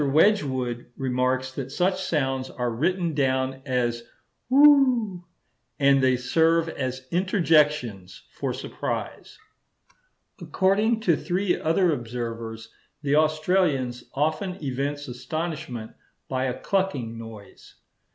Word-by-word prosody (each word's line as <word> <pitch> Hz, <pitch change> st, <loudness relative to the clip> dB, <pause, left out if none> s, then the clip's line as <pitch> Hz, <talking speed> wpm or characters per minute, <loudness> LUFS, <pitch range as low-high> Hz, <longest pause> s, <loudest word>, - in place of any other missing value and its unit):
Wedgwood 135 Hz, -, +2 dB
remarks 130 Hz, 0 st, 0 dB
that 135 Hz, 0 st, -6 dB
such 185 Hz, +4 st, 0 dB
sounds 135 Hz, -6 st, -1 dB
are 125 Hz, -1 st, -3 dB
written 170 Hz, +7 st, 0 dB
down 130 Hz, -1 st, 0 dB
as 120 Hz, -2 st, 0 dB, 0.5 s
whew, 255 Hz, -9 st, +5 dB, 0.5 s
and 140 Hz, -1 st, +4 dB
they 130 Hz, -1 st, +4 dB
serve 165 Hz, +6 st, +2 dB
as 130 Hz, -4 st, -4 dB
interjections 150 Hz, -, +1 dB
for -, -, -3 dB
surprise. -, -, -5 dB, 1.0 s
According 210 Hz, +4 st, +1 dB
to 175 Hz, -7 st, +3 dB
three 180 Hz, +4 st, 0 dB
other 165 Hz, +1 st, +2 dB
observers, 115 Hz, -2 st, -6 dB, 0.3 s
the 145 Hz, 0 st, +2 dB
Australians 155 Hz, -5 st, +1 dB
often 155 Hz, +6 st, -1 dB
evince 145 Hz, +1 st, -3 dB
astonishment 130 Hz, -3 st, -5 dB, 0.4 s
by 130 Hz, 0 st, -1 dB
a 125 Hz, -1 st, -3 dB
clucking 165 Hz, -, -1 dB
noise. 110 Hz, -3 st, -12 dB
140 Hz, 100 wpm, -25 LUFS, 125-175 Hz, 1.0 s, whew